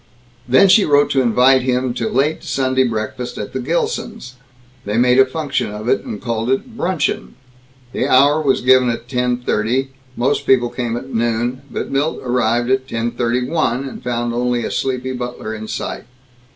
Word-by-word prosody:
Then 165 +11 +6
she 200 +2 +6
wrote 145 -2 +3
to 135 - +3
invite 125 +2 +4
him 125 0 0
to 115 -2 -2
late 140 +5 0
Sunday 130 -3 +1
breakfast 115 +1 -4
at 105 - -6
the 130 - -2
Gilsons' 130 -3 -3 0.5
they 105 +2 -2
made 125 +1 +4
a 135 - +6
function 140 -2 -2
of 105 +2 -7
it, 130 - +1
and 105 - -6
called 115 0 -2
it 225 - -1
bruncheon. 180 -7 -2 0.6
The - - -1
hour 145 +4 +4
was 140 -3 +1
given 130 0 +4
as 115 - -2
ten 125 -1 0
thirty; 125 +3 -1 0.3
most 135 +4 0
people 120 -2 +3
came 120 -2 -3
at 130 +2 -8
noon; 120 +2 -1
but - - -5
Milt 145 +4 0
arrived 120 -1 +1
at 130 0 +1
ten 115 -1 -2
thirty 120 +1 -1
one, 135 -4 0
and 130 - -9
found 120 -1 -2
only 120 -1 0
a - - -4
sleepy 130 -1 -2
butler 125 -3 -5
in 110 0 -7
sight. - - -5
125 Hz, 180 wpm, -18 LUFS, 120-135 Hz, 0.6 s, Then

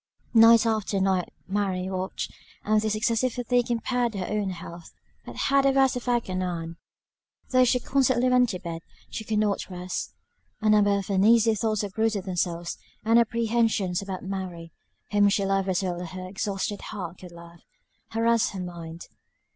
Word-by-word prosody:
Night 230 0 +7
after 215 -3 0
night 190 -2 +1 0.2
Mary 190 -2 -1
watched, 190 0 -4 0.3
and 215 0 +2
this 215 0 0
excessive 230 +3 +1
fatigue 245 -1 0
impaired 240 -1 0
her 185 -2 -3
own 210 -2 -1
health, 170 -2 -8 0.4
but - - -8
had 275 0 +2
a 275 - +4
worse 270 -1 +3
effect 245 -1 -1
on 185 0 -2
Ann; 170 -2 -4 0.7
though 255 0 +5
she 250 +1 +2
constantly 255 -1 +2
went 250 -1 +4
to 185 - -3
bed, 170 -2 -6 0.3
she 220 - -5
could 215 0 -1
not 210 -2 0
rest; 180 0 -5 0.4
a 215 -1 +2
number 205 -1 +4
of 200 0 -4
uneasy 220 +3 +5
thoughts 215 -1 0
obtruded 210 0 -1
themselves; 175 -2 -2 0.3
and 230 +1 +5
apprehensions 225 -5 +1
about 190 -2 -6
Mary, 185 -3 -5 0.4
whom 205 -1 +4
she 200 0 +1
loved 195 0 0
as 185 +1 0
well 175 -2 -2
as 180 - -6
her 185 0 -6
exhausted 200 +1 -3
heart 180 -5 -7
could 180 -1 -11
love, 170 0 -13 0.5
harassed 230 0 +2
her 195 - -5
mind. 170 -2 -7
205 Hz, 170 wpm, -26 LUFS, 185-230 Hz, 0.7 s, Night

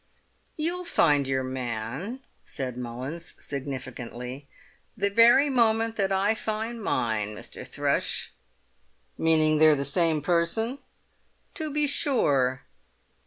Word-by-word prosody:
"You'll 345 +4 0
find 145 - +3
your 135 -1 0
man," 130 - -4 0.2
said 130 -3 -5
Mullins 130 +8 -6
significantly, 130 -1 -6 0.5
"the 200 -1 0
very 235 +6 +6
moment 225 -3 +2
that 195 -2 +1
I 195 +3 +2
find 220 +1 -3
mine, 105 - -1
Mr. - - -9
Thrush." - - -1 0.8
"Meaning 155 -1 +3
they're 155 -1 +7
the 140 -1 -2
same 155 +1 +1
person?" 180 - 0 0.7
"To 310 -2 -3
be 300 +1 +2
sure." 145 - +1
160 Hz, 110 wpm, -27 LUFS, -, 0.8 s, they're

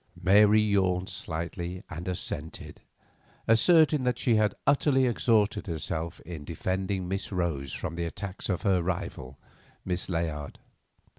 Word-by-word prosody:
Mary 105 +3 +6
yawned 95 -3 +1
slightly 85 +1 -5
and 85 +4 -7
assented, 80 -4 -5 0.7
asserting 150 +6 +5
that 125 -1 0
she 120 - +2
had 110 -1 +2
utterly 140 -1 +3
exhausted 110 -4 +1
herself 80 -1 -3
in 80 -4 -8
defending 95 +3 -2
Miss 95 +2 -3
Rose 85 -7 -2
from - - -4
the 85 0 -3
attacks 95 +4 -5
of 90 - -1
her 95 -3 +3
rival, 85 -7 -4 0.5
Miss 90 0 -2
Layard. 80 -4 -3
95 Hz, 130 wpm, -28 LUFS, 85-105 Hz, 0.7 s, Mary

